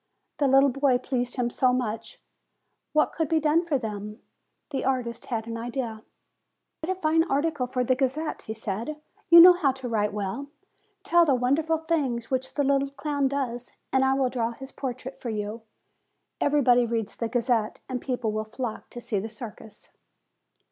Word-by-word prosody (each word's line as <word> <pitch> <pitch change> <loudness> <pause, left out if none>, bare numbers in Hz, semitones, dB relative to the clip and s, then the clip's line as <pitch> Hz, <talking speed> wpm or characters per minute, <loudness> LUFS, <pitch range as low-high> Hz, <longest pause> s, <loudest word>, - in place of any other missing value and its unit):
The 285 - +3
little 270 +1 +5
boy 275 -1 +3
pleased 245 -1 -2
him 240 -2 0
so 255 +1 +3
much! 230 -3 -3 0.7
What 305 0 +2
could 320 -3 -1
be 320 - +3
done 310 +2 +3
for 320 -5 0
them? 210 -2 -6 0.5
The 270 - -2
artist 250 -3 -2
had 225 -3 -2
an 230 0 -5
idea. 235 -1 -4 0.8
"Write 375 +3 -1
a - - -19
fine 320 -1 +3
article 290 -3 0
for 250 0 -1
the 255 - +3
Gazette," 275 +4 -1
he 220 - -4
said: 225 +8 -4 0.3
"you 340 +1 +10
know 360 +2 +11
how 330 -6 +2
to 265 -1 -6
write 210 -3 0
well. 205 +7 -4 0.6
Tell 345 0 +5
the 285 -5 +3
wonderful 295 +6 +1
things 285 -8 -1
which 260 0 -2
the 285 - +2
little 275 0 +2
clown 285 0 -1
does, 250 -3 -3 0.2
and 265 0 +4
I 265 0 +3
will 265 -2 +1
draw 235 -2 -1
his 265 +3 -10
portrait 255 0 -6
for 240 - -4
you. 215 +1 -4 0.8
Everybody 250 -4 +4
reads 225 -2 -2
the 230 - -3
Gazette, 235 -2 0
and 250 -2 -3
people 245 -4 -2
will 215 0 -2
flock 225 +1 -5
to 240 - -8
see 210 -4 -1
the 220 +4 -5
circus." 215 -1 -10
255 Hz, 180 wpm, -26 LUFS, 230-280 Hz, 0.8 s, know